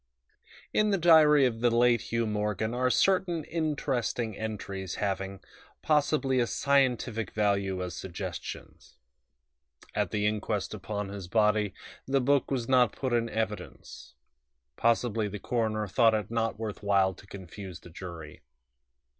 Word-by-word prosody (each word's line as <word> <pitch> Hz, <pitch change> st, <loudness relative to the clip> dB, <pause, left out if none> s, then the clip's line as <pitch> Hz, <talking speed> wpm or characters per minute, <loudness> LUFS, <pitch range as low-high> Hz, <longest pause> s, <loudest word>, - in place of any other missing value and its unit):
IV -, -, -46 dB, 0.3 s
In 215 Hz, 0 st, +3 dB
the 200 Hz, -, +2 dB
diary 155 Hz, -4 st, +6 dB
of 115 Hz, -3 st, -1 dB
the 120 Hz, +1 st, +3 dB
late 120 Hz, -1 st, +3 dB
Hugh 115 Hz, 0 st, 0 dB
Morgan 105 Hz, +1 st, -1 dB
are 125 Hz, +1 st, +1 dB
certain 180 Hz, +1 st, +2 dB
interesting 135 Hz, -8 st, -2 dB
entries 100 Hz, -3 st, -5 dB
having, 95 Hz, -1 st, -3 dB, 0.4 s
possibly, 145 Hz, -3 st, +2 dB
a 120 Hz, -, +2 dB
scientific 125 Hz, -7 st, +1 dB
value 100 Hz, -3 st, 0 dB
as 90 Hz, -1 st, -5 dB
suggestions. 90 Hz, -3 st, -7 dB, 1.0 s
At -, -, 0 dB
the 105 Hz, -1 st, -1 dB
inquest 105 Hz, -1 st, -1 dB
upon 105 Hz, 0 st, -4 dB
his 100 Hz, -3 st, -7 dB
body 105 Hz, -1 st, +2 dB, 0.3 s
the 135 Hz, +1 st, +2 dB
book 140 Hz, +1 st, +2 dB
was 125 Hz, -4 st, -2 dB
not 125 Hz, -3 st, +4 dB
put 130 Hz, -3 st, -3 dB
in 115 Hz, -1 st, +1 dB
evidence; 110 Hz, -2 st, -5 dB, 0.6 s
possibly 115 Hz, -, +1 dB
the 105 Hz, 0 st, -5 dB
coroner 110 Hz, -1 st, -1 dB
thought 115 Hz, +2 st, +4 dB
it 105 Hz, 0 st, -3 dB
not 115 Hz, -1 st, -1 dB
worth 110 Hz, -2 st, -5 dB
while 100 Hz, -2 st, +2 dB
to 100 Hz, -, -16 dB
confuse 95 Hz, -1 st, -9 dB
the 90 Hz, -, -13 dB
jury. 85 Hz, -3 st, -9 dB
110 Hz, 140 wpm, -29 LUFS, 100-125 Hz, 1.0 s, diary